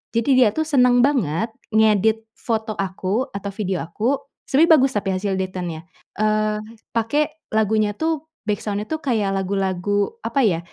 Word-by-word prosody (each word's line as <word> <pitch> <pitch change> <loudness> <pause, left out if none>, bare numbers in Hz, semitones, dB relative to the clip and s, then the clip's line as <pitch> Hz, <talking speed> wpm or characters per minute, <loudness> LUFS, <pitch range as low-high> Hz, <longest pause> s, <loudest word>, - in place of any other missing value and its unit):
Jadi, 230 +3 +1
dia 235 -5 +5
tuh 315 - +1
seneng 250 -4 +5
banget 225 - +1 0.3
ngedit 220 0 +3
foto 220 -2 -2
aku, 195 +5 -1
atau 200 0 -4
video 195 -3 -2
aku, 220 +11 0 0.3
sebenernya 320 +4 +5
bagus 270 -2 +3
tapi 200 -1 -1
hasil 195 +1 -1
editannya. 180 -3 -4 0.3
Eee, 215 0 +1 0.3
pake 295 +7 -1
lagunya 215 -1 +2
tuh, 320 +1 -1 0.2
backsound-nya 205 0 -2
tuh, 315 - -2
kayak 225 -9 0
lagu-lagu, 195 - -1
apa 275 - +1
ya, 180 -7 +2
215 Hz, 145 wpm, -22 LUFS, 195-250 Hz, 0.3 s, dia